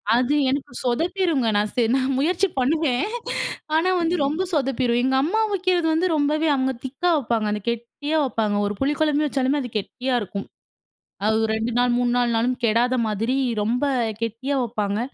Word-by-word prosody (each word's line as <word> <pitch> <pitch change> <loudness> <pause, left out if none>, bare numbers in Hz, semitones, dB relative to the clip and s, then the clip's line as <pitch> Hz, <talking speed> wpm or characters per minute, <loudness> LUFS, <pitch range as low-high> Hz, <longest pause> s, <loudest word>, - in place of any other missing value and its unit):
அது 250 +4 +2
எனக்கு 275 -1 -3
சொதப்பிருங்க 325 +1 0
நான் 210 0 0
சென் 235 -1 +2
நான் 265 0 0
முயற்சி 350 +6 +2
பண்ணுவேன். 275 -1 +1 0.7
ஆனா 330 +4 +3
வந்து 335 +1 +1
ரொம்ப 300 +6 -1
சொதப்பிரும் 260 -4 +1
எங்க 265 +1 +2
அம்மா 415 +9 +1
வைக்கிறது 365 -3 +1
வந்து 335 +4 +2
ரொம்பவே 305 +2 +1
அவங்க 265 0 0
திக்கா 275 +7 -1
வைப்பாங்க. 230 -5 -1
அந்த 210 0 -2
கெட்டியா 240 +7 -3
வைப்பாங்க. 225 -6 0
ஒரு 205 +1 -2
புளி 280 +2 +1
குழம்பு 300 -1 +2
வச்சாலுமே 270 +1 0
அது 245 - -5
கெட்டியா 250 +5 -2
இருக்கும். 200 0 -5 0.8
அது 220 +1 +3
ஒரு 220 - 0
2 225 +2 -2
நாள் 245 -1 +2
3 245 0 +1
நாள் 240 -1 +1
நாளும் 245 +2 0
கெடாத 235 +3 +2
மாதிரி 225 +5 -1 0.3
ரொம்ப 240 +5 0 0.4
கெட்டியா 230 +5 -2
வைப்பாங்க. 210 -3 -2
260 Hz, 165 wpm, -23 LUFS, 235-295 Hz, 0.8 s, ஆனா